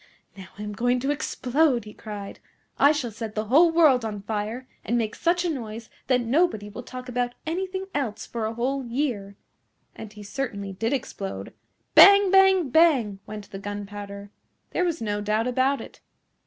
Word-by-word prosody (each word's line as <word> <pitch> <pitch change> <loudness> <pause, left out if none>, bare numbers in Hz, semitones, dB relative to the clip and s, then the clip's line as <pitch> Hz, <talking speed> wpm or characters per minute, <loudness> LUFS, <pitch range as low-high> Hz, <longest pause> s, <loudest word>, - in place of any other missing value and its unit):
"Now 190 -2 -10
I 210 - -6
am 210 0 -5
going 245 +3 +1
to 275 +2 0
explode," 275 -3 +1
he 210 - -10
cried. 205 -2 -8 0.4
"I 285 - +7
shall 285 -6 -2
set 220 0 -7
the 215 0 -1
whole 305 +10 +5
world 305 -7 +5
on 210 -3 -5
fire, 220 +4 -4 0.2
and 235 +3 0
make 220 -2 -1
such 350 +1 +1
a - - +1
noise 225 -3 -7 0.2
that 255 -2 +3
nobody 240 - +1
will 210 - -8
talk 255 +1 -9
about 245 0 -2
anything 375 +3 -3
else 225 -7 -3
for 225 -2 -3
a 220 - -4
whole 265 +3 -1
year." 235 -6 -3 0.6
And 215 - -9
he 210 -1 -11
certainly 200 -4 -4
did 225 +5 -2
explode. 205 -7 -4 0.4
Bang! 400 -1 +8
Bang! 385 -5 +5
Bang! 265 -12 +4
went 210 -1 -8
the 195 - -6
gunpowder. 205 0 -7 0.4
There 360 - 0
was 335 -7 -2
no 205 -1 -2
doubt 215 +2 0
about 260 +2 +1
it. - - -11
235 Hz, 180 wpm, -25 LUFS, 210-285 Hz, 0.6 s, Bang